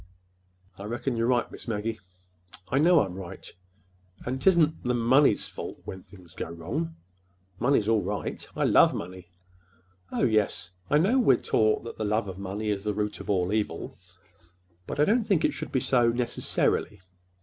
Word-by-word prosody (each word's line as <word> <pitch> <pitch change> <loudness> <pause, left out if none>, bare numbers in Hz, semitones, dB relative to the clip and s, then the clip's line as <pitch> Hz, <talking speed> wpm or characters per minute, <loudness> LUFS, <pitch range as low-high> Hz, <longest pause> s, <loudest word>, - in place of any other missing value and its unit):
"I 100 - -7
reckon—you're 120 +1 -1
right, 125 -1 +1
Miss - - -9
Maggie." 110 0 -2 0.7
"I 135 - +2
know 170 +1 +5
I'm 95 -3 -3
right, 95 -2 -8 0.8
and 130 +2 -2
'tisn't 160 -2 +3
the 125 0 0
money's 120 0 +3
fault - - -7
when 95 - -7
things 90 -2 -17
go 80 - -5
wrong. 85 0 -4 0.6
Money's 120 -4 +2
all 110 -2 +3
right. 100 +3 -4
I - - 0
love - - +5
money. 90 0 -7 0.8
Oh, - - -1
yes, 105 -6 +1 0.2
I 150 - +4
know—we're 195 - +4
taught 110 -1 +1
that 115 - -9
the - - -1
love 105 +1 0
of 95 0 -7
money 100 +2 -3
is 100 -1 -3
the 105 -1 -2
root 105 -1 -2
of - - -9
all 95 -1 +1
evil. 110 -1 -3 0.9
But - - -5
I 150 - +5
don't 225 +4 +2
think 195 -7 +2
it - - +1
should - - -6
be 130 - +1
so—necessarily. 120 -4 +1
110 Hz, 165 wpm, -27 LUFS, 100-130 Hz, 0.9 s, know